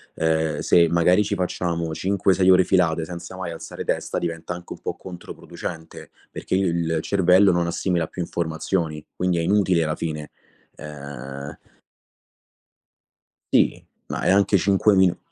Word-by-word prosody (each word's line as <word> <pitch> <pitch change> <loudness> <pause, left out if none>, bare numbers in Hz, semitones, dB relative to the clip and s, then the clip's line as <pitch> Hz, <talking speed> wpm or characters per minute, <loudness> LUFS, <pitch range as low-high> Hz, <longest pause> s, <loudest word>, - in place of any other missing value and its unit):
ehm, 80 -2 0
se 85 -1 +4
magari 90 +4 +4
ci 100 0 -2
facciamo 85 -3 -2
5-6 95 +1 +2
ore 95 0 +6
filate, 85 -3 +2
senza 85 +2 -8
mai 95 -2 -4
alzare 85 - -7
testa, - - -2
diventa 85 0 -4
anche 90 0 -8
un - - -13
po' - - -4
controproducente, 85 -2 -9 0.2
perché - - -3
il 85 -4 0
cervello 95 +1 +4
non 85 0 +1
assimila 85 -1 -1
più 90 - -6
informazioni, 80 -2 -2
quindi 90 -1 0
è 85 - +1
inutile 90 -2 +2
alla 75 - -1
fine. 75 -2 -5 0.4
Ehm 70 -1 -8 1.9
Sì, - - +3 0.2
ma - - -4
è - - +1
anche 100 +1 +4
5 100 +2 +3
minu 95 -2 +3
85 Hz, 140 wpm, -23 LUFS, 80-95 Hz, 1.9 s, ore